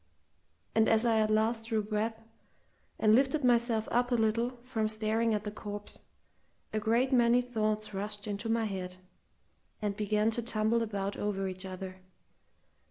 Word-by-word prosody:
And 220 0 +4
as 225 +1 +3
I 225 -2 +3
at 215 0 +2
last 225 +1 +1
drew 220 -2 0
breath, 220 +2 -2 0.7
and 215 -1 +4
lifted 270 +4 +3
myself 235 -2 +2
up 245 +1 +2
a - - +4
little 230 +2 +1
from 225 -4 -1
staring 220 +1 +1
at 210 - -2
the 210 - -4
corpse, 205 -1 -5 0.7
a 215 - +1
great 235 +5 +2
many 240 -1 +5
thoughts 215 -3 -1
rushed 205 +1 -3
into 205 +1 -4
my 225 0 +1
head, 185 -3 -4 0.8
and 205 -2 -2
began 210 +1 +1
to 235 - -2
tumble 225 0 +1
about 200 -3 -2
over 195 -2 -1
each 185 0 -5
other. 185 0 -7
220 Hz, 160 wpm, -31 LUFS, 210-230 Hz, 0.8 s, many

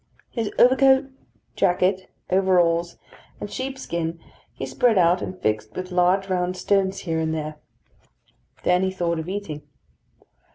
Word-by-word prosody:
His 225 -3 -2
overcoat, 265 +2 +5 0.4
jacket, 185 +1 +1 0.2
overalls, 175 -3 +2 0.4
and 205 - -6
sheepskin 170 -12 -4 0.3
he - - -6
spread 210 - +2
out 175 0 +4
and 185 - -6
fixed 110 -3 -2
with 185 0 -5
large 180 +2 +2
round 180 -1 -1
stones 195 +1 +1
here 165 -3 -2
and 160 0 -1
there. 155 -1 -5 1.1
Then 180 0 +3
he 190 - +1
thought 170 -3 -1
of 160 +2 -5
eating. 190 -7 -5
180 Hz, 130 wpm, -23 LUFS, 170-195 Hz, 1.1 s, overcoat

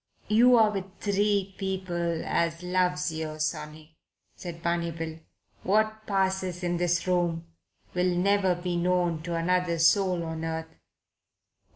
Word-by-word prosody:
"You're 225 0 +6
with 195 -2 -6
three 200 -1 +1
people 175 -4 -2
as 165 +1 0
loves 180 -3 0
yer, 155 -1 -4
sonny," 155 0 -4 0.4
said 170 -1 -8
Barney 170 0 0
Bill. 165 -1 -6 0.4
"What 215 +2 +1
passes 190 -2 0
in 175 0 0
this 175 0 +1
room 175 -2 0 0.5
will 180 0 +1
never 190 0 +3
be 175 0 -3
known 175 -2 +1
to 170 +1 -4
another 175 0 +1
soul 175 +2 +3
on 160 0 -5
earth." 160 0 -4
175 Hz, 130 wpm, -27 LUFS, 165-190 Hz, 0.5 s, You're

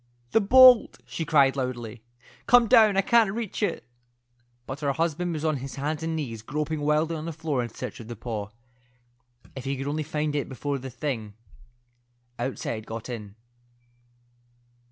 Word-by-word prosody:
"The 225 - +4
bolt," 250 +3 +7
she 165 - -4
cried, 140 -4 +4
loudly. 120 -4 -4 0.5
"Come 245 0 +6
down. 215 -2 +6
I - - +5
can't 225 0 +4
reach 225 -1 -4
it." 200 -5 -1 0.8
But 135 +1 -6
her 140 -1 0
husband 165 +3 -1
was 155 0 -4
on 155 -2 +1
his 135 +1 -7
hands 150 +2 -3
and 160 0 -2
knees 120 -8 -4
groping 150 +5 -3
wildly 155 +2 +1
on 155 0 -5
the 165 - -3
floor 155 -4 -2
in 120 - -4
search - - -7
of 115 - -10
the 120 - -6
paw. 105 -3 -5 1.1
If 130 -1 -7
he 135 0 -2
could 135 - -4
only 150 +2 -1
find 150 0 -2
it 145 - -2
before 140 +1 -3
the 130 +1 -7
thing 120 -6 -4 1.0
outside 120 -3 -4
got 115 +2 -6
in. 105 -4 -7
145 Hz, 170 wpm, -26 LUFS, 125-165 Hz, 1.1 s, bolt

